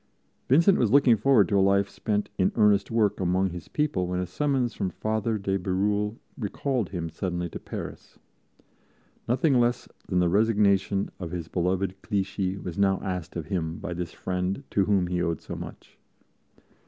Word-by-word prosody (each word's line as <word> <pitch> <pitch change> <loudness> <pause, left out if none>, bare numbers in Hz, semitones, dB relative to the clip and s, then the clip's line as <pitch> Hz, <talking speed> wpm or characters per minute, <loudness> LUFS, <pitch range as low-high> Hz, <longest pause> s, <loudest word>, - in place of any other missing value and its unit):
Vincent 170 +9 +5
was 120 - +3
looking 130 -1 +6
forward 110 -2 +4
to 100 +3 +2
a - - +4
life 100 +1 +3
spent 105 +1 -2
in 95 - +3
earnest 105 -3 +4
work 105 -3 +1
among 95 +1 +1
his 85 -1 -8
people 150 -12 -1
when 90 0 -2
a 90 - -1
summons 130 - 0
from 95 - -2
Father 110 +2 -1
de 95 -1 -1
Bérulle 105 +3 0 0.2
recalled 120 0 -2
him 85 -4 -4
suddenly 90 +1 -3
to - - -7
Paris. - - -8 1.1
Nothing 130 +2 +3
less 120 +1 +1 0.2
than 90 - -1
the 90 0 +4
resignation 100 0 +2
of 90 -3 -5
his 85 -1 -5
beloved 95 +2 -1
Clichy 95 -1 -2
was 90 -1 -6
now 95 -1 +3
asked 90 -3 -4
of 85 -3 -4
him 80 -1 -2
by 95 -4 -5
this 85 -1 -4
friend 90 +6 -3
to 100 - +2
whom 100 -3 +2
he 90 0 -1
owed 85 -3 -1
so - - -7
much. - - -10
100 Hz, 175 wpm, -26 LUFS, 90-110 Hz, 1.1 s, looking